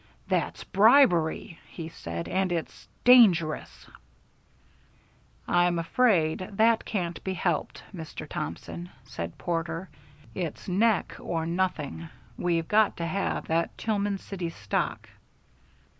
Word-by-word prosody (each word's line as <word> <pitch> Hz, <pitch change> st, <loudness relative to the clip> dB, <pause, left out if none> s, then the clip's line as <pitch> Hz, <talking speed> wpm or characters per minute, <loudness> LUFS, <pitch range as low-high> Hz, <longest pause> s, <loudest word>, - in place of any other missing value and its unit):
"That's -, -, -1 dB
bribery," 195 Hz, -, +4 dB
he 165 Hz, -2 st, -7 dB
said, 85 Hz, -, -6 dB
"and 190 Hz, 0 st, 0 dB
it's 170 Hz, -2 st, -4 dB, 0.2 s
dangerous." 190 Hz, -11 st, +5 dB, 1.6 s
"I'm 175 Hz, 0 st, +3 dB
afraid 165 Hz, -3 st, +2 dB
that 225 Hz, +2 st, +3 dB
can't 175 Hz, -5 st, -3 dB
be 190 Hz, 0 st, -2 dB
helped, 175 Hz, -3 st, -2 dB
Mr. 160 Hz, -3 st, -7 dB
Thompson," 145 Hz, -, -6 dB
said 85 Hz, -11 st, -6 dB
Porter. 165 Hz, +1 st, -3 dB, 0.4 s
"It's 170 Hz, -5 st, -5 dB
neck 205 Hz, +3 st, +2 dB
or 165 Hz, -1 st, -2 dB
nothing. 170 Hz, -2 st, -2 dB, 0.3 s
We've 165 Hz, -2 st, 0 dB
got 215 Hz, 0 st, +3 dB
to 170 Hz, -, -2 dB
have 190 Hz, +4 st, -2 dB
that 165 Hz, +1 st, -1 dB
Tillman 205 Hz, -2 st, -1 dB
City 185 Hz, -3 st, -5 dB
stock." -, -, -3 dB
175 Hz, 110 wpm, -27 LUFS, 165-195 Hz, 1.6 s, dangerous